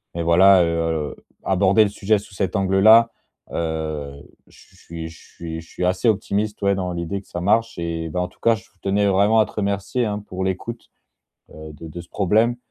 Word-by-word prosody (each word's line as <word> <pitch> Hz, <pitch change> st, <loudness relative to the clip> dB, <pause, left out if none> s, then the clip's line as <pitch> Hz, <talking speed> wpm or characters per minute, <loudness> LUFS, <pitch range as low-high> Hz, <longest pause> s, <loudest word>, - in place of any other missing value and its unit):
mais, 85 Hz, -, -2 dB
voilà, 90 Hz, +2 st, +6 dB
heu, 80 Hz, -2 st, -1 dB, 0.3 s
aborder 100 Hz, +3 st, +3 dB
le 100 Hz, -, 0 dB
sujet 105 Hz, +1 st, +1 dB
sous 100 Hz, -, -15 dB
cet 95 Hz, 0 st, -2 dB
angle-là, 110 Hz, +4 st, +5 dB, 0.4 s
heu, 80 Hz, -3 st, -3 dB, 0.4 s
ch -, -, -19 dB
je -, -, -22 dB
suis 80 Hz, -1 st, -8 dB
je 80 Hz, -, -14 dB
suis 80 Hz, -1 st, -8 dB
je 80 Hz, -, -18 dB
suis 90 Hz, -, -3 dB
assez 95 Hz, +6 st, +2 dB
optimiste, 105 Hz, 0 st, -1 dB
ouais, 100 Hz, 0 st, +3 dB
dans 90 Hz, -2 st, -3 dB
l'idée 85 Hz, +3 st, -4 dB
que -, -, -26 dB
ça 85 Hz, -, -5 dB
marche 110 Hz, +5 st, +1 dB
et 80 Hz, -1 st, -3 dB
bah, 90 Hz, -, -3 dB
en 90 Hz, -, -2 dB
tout -, -, -27 dB
cas, 115 Hz, 0 st, +4 dB
je 95 Hz, -, -12 dB, 0.2 s
tenais 100 Hz, +1 st, +1 dB
vraiment 100 Hz, +3 st, +3 dB
à 110 Hz, -, +4 dB
te -, -, -14 dB
remercier, 100 Hz, +4 st, -1 dB
hein, 105 Hz, -1 st, -2 dB
pour 95 Hz, 0 st, -4 dB
l'écoute, 95 Hz, +5 st, -4 dB, 0.7 s
heu, 80 Hz, 0 st, -10 dB
de 80 Hz, -, -11 dB
de 85 Hz, +3 st, -8 dB
ce 85 Hz, -, -13 dB
problème 110 Hz, +5 st, +1 dB
95 Hz, 210 wpm, -21 LUFS, 85-105 Hz, 0.7 s, voilà